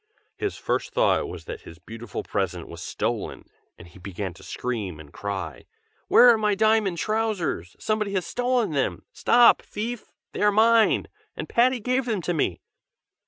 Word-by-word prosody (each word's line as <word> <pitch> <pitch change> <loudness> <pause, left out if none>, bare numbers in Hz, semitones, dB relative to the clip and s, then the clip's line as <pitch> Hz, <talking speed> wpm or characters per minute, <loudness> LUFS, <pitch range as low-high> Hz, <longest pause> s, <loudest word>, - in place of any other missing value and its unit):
His - - -3
first - - -2
thought - - +2
was - - -9
that - - -7
his 85 - -12
beautiful 115 +5 -7
present 90 -4 -3
was 85 -1 -10
stolen, - - -3 0.3
and 85 - -13
he 85 +2 -16
began 95 0 -5
to - - -16
scream 105 -10 -4
and 75 -2 -13
cry: 95 -8 -5 0.4
'Where 245 - +8
are 230 -2 +5
my 210 -1 +2
diamond 215 -3 +2
trousers? 215 - -2
somebody 215 -2 -1
has 185 -3 -1
stolen 245 -5 0
them! 120 - -1
stop 240 0 +5
thief! 230 +2 -6 0.2
they - - -5
are 210 0 +5
mine, 225 +1 +4 0.3
and - - -5
Patty 250 +1 +3
gave 255 +3 0
them 215 -7 -2
to 175 - -1
me!' 140 - -1
190 Hz, 165 wpm, -25 LUFS, -, 0.4 s, Where